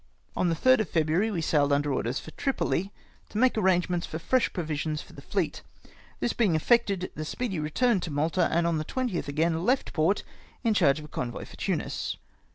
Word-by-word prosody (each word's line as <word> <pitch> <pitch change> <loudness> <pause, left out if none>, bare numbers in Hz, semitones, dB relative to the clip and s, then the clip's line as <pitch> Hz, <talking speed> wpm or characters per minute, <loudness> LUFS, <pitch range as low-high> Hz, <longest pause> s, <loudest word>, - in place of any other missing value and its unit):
On 180 - +1
the 165 - +1
3rd 255 +9 +5
of 215 -7 -1
February 165 +6 +2
we 175 -6 -2
sailed 145 -2 +2
under 145 0 +2
orders 125 0 -1
for 160 - -10
Tripoli, 200 - -1 0.4
to - - -6
make 255 +2 +4
arrangements 180 -4 +1
for 160 - -5
fresh 255 +10 +1
provisions 155 -3 -2
for - - -17
the - - -11
fleet. - - -2 0.6
This 240 - 0
bemg 205 -9 +2
effected, 195 +1 +2
the 155 - -5
Speedy 195 +2 -3
retm^ned 190 +8 +1
to 165 - -4
Malta, 155 +5 +1
and 170 +1 +2
on 170 -2 +1
the 155 - -3
20th 245 - -2
again 160 +3 0
left 255 +6 +1
port 170 +5 +2 0.4
in 225 -2 +3
charge 140 -8 +4
of 155 - -7
a 150 - -16
convoy 120 -1 -4
for - - -13
Tunis. - - -2
170 Hz, 200 wpm, -28 LUFS, 155-210 Hz, 0.6 s, 3rd